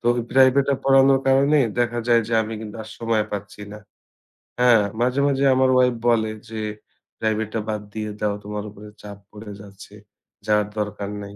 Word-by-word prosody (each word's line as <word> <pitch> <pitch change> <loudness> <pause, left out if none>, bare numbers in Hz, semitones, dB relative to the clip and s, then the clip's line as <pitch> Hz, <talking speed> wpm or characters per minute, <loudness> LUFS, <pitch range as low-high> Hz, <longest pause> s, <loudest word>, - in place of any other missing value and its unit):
তো - - -7
ওই 120 - -2
প্রাইভেটটা 135 +1 +4
পড়ানোর 135 0 +5
কারণে 140 +3 +4 0.2
দেখা 120 0 0
যায় 120 -1 +4
যে - - -5
আমি 110 +1 -6
কিন্তু 110 0 -8
আর 110 - -12
সময় 115 -2 0
পাচ্ছি 105 0 -7
না। 105 - -9 0.8
হ্যাঁ? 120 -3 +5 0.2
মাঝে, 125 +3 +1
মাঝে 140 -1 0
আমার 130 0 +3
ওয়াইফ 125 -1 +3
বলে 110 -2 +1 0.2
যে, 110 -1 -5 0.6
"প্রাইভেটটা 110 0 -2
বাদ 105 -1 -2
দিয়ে 110 -1 -4
দাও, 105 -1 0
তোমার 105 0 -5
উপরে 105 +1 -13
চাপ 100 -1 -10
পড়ে 105 0 -10
যাচ্ছে, 100 0 -14 0.5
যাওয়ার 105 -1 +2
দরকার 105 -1 -4
নাই।" 100 0 -10
110 Hz, 175 wpm, -22 LUFS, 105-125 Hz, 0.8 s, পড়ানোর